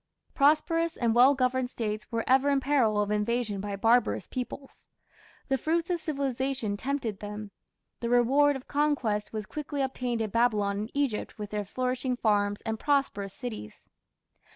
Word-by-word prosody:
Prosperous 330 +3 +2
and 230 -2 +1
well 255 +4 +6
governed 255 -1 +1
States 215 -3 -4
were 230 -1 -1
ever 265 +2 +4
in 280 -1 +3
peril 255 -7 +2
of 205 0 0
invasion 210 -1 0
by 205 0 -4
barbarous 220 - +2
peoples. 260 +2 -7 0.6
The 270 -1 +1
fruits 335 +5 0
of 350 - 0
civilization 270 -7 -2
tempted 235 -3 -3
them; 210 0 -7 0.5
the 235 - -2
reward 270 +4 +4
of 265 - -8
conquest 275 -8 0
was 215 -2 -4
quickly 290 +2 -3
obtained 250 -3 -2
in 215 -2 -2
Babylon 210 -4 +2
and 215 +3 -5
Egypt 275 -8 -1
with 210 -1 -6
their 210 -1 -2
flourishing 255 +3 -2
farms 205 -3 +1
and 220 -1 -3
prosperous 275 -9 0
cities. 225 - -8
245 Hz, 155 wpm, -28 LUFS, 210-275 Hz, 0.6 s, well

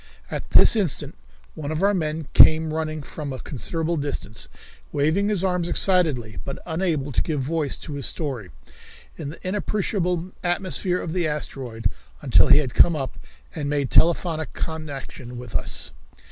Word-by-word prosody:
At - - -4
this - - +7
instant 195 - -1 0.4
one 150 -1 -5
of 155 +4 -1
our 200 +1 +4
men 155 -4 -2
came 155 0 +6
running 155 -1 -3
from 145 0 -6
a 130 - -4
considerable 165 +4 -2
distance, 140 -7 -4 0.4
waving 160 +8 +1
his 200 -4 0
arms 180 -2 0
excitedly, 155 - +2
but 135 - -5
unable 160 -4 -1
to - - +1
give 150 -4 -1
voice 150 +1 0
to 150 - -8
his 140 -2 -3
story, 130 - -4 0.7
in 140 - -6
the 165 +4 -8
inappreciable 185 -3 -1
atmosphere 180 0 0
of 160 - -4
the 175 -3 +1
asteroid, 130 -6 -3 0.3
until - - +5
he - - +7
had 135 -5 0
come 170 - +5
up 135 -4 -4 0.3
and 145 -2 -3
made 145 -3 0
telephonic 160 -3 +3
connection 140 -6 -6
with 125 0 -9
us. - - -2
155 Hz, 160 wpm, -24 LUFS, 140-175 Hz, 0.7 s, this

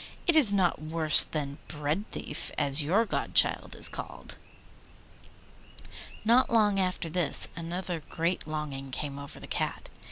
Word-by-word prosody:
'It 340 - +1
is 275 -10 +7
not 185 -6 -1
worse 155 0 +7
than 145 -2 -7
Breadthief, 150 +1 -6
as 140 +2 +4
your 190 +10 0
godchild - - 0
is - - +6
called.' - - -8 1.9
Not 240 +4 +2
long 210 -4 +1
after 185 -2 -3
this 165 -3 +1
another 175 +1 -6
great 170 0 -4
longing 145 -3 -7
came 140 +1 -7
over 140 0 -11
the - - -12
Cat. - - -6
165 Hz, 130 wpm, -26 LUFS, 150-195 Hz, 1.9 s, is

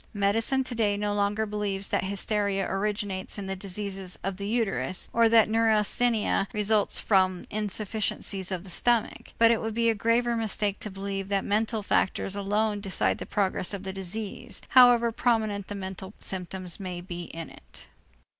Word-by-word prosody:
Medicine 225 +6 +1
today 225 -5 0
no 205 0 -1
longer 205 +1 0
believes 205 -2 -2
that - - 0
hysteria 200 0 0
originates 200 -1 -2
in 200 - -5
the 190 0 -3
diseases 195 -1 -5
of 195 0 -3
the 200 0 -4
uterus 195 - 0
or 230 -1 +5
that 225 -1 +6
neurasthenia 225 +1 +2
necessarily 195 - +1
results 210 0 +2
from 185 -3 +2
insufficiencies 210 -2 -1
of 185 -2 -3
the 195 - -9
stomach, 235 +3 0
but 230 0 +6
it 230 - +1
would 225 -1 -3
be 230 0 +3
a - - 0
graver 235 +2 +1
mistake 210 -2 -1
to 215 - -4
believe 195 0 -4
that 195 -1 0
mental 215 +1 0
factors 195 0 0
alone 205 +1 0
decide 195 -2 0
the - - -6
progress 195 -1 -1
of 195 - -8
the 190 -1 -4
disease, 195 +2 -3
however 245 -2 +6
prominent 220 -4 0
the 205 - -5
mental 190 0 -7
symptoms 185 -1 -3
may 180 -2 -5
be 175 -1 -6
in 165 0 -8
it. - - -12
205 Hz, 170 wpm, -27 LUFS, 195-220 Hz, -, that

